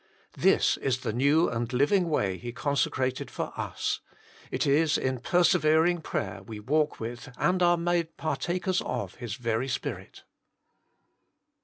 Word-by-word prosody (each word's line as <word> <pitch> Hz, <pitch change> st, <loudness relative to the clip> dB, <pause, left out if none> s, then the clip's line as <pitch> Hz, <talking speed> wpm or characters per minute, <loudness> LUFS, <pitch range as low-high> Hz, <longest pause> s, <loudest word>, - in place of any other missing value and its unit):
This -, -, +3 dB
is 130 Hz, -2 st, -1 dB
the 115 Hz, -4 st, -2 dB
new 140 Hz, +7 st, +3 dB
and 115 Hz, 0 st, -2 dB
living 165 Hz, +8 st, +2 dB
way 95 Hz, -, 0 dB
He 120 Hz, -, -6 dB
consecrated 130 Hz, -1 st, -1 dB
for -, -, -4 dB
us; -, -, -2 dB, 0.5 s
it -, -, -1 dB
is 150 Hz, +2 st, +3 dB
in 130 Hz, -1 st, -1 dB
persevering 175 Hz, +1 st, +3 dB
prayer 100 Hz, -, -3 dB
we 105 Hz, +2 st, -8 dB
walk 150 Hz, +7 st, 0 dB
with 120 Hz, +3 st, -6 dB
and 185 Hz, 0 st, +1 dB
are 175 Hz, 0 st, +5 dB
made 170 Hz, -1 st, -1 dB
partakers 180 Hz, +3 st, -1 dB
of 125 Hz, -1 st, -4 dB
His 120 Hz, -4 st, -5 dB
very 120 Hz, 0 st, -1 dB
Spirit. 130 Hz, -, -5 dB
140 Hz, 140 wpm, -28 LUFS, 120-170 Hz, 0.5 s, are